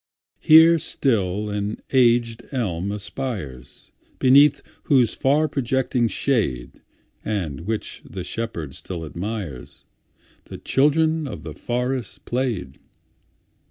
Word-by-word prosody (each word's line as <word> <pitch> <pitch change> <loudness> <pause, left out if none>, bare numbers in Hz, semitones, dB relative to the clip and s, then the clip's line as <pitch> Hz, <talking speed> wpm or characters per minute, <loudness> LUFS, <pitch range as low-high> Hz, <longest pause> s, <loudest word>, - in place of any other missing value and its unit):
Here 160 +1 +7
still 105 - 0
an 105 +1 -3
aged 120 -2 +2
elm 100 - -2
aspires, 100 - -6 0.3
Beneath 140 +2 +5 0.2
whose 125 -6 +3
far 150 +4 +2
projecting 130 -3 0
shade(And 90 - -3
which 110 -1 -4
the - - -7
shepherd 85 -11 -5
still 85 -3 -6
admires)The 85 - -9
children 155 +2 +2
of 115 - -7
the - - -7
forest 125 -2 -3
played. 120 - -3
115 Hz, 90 wpm, -22 LUFS, 95-135 Hz, 0.3 s, Here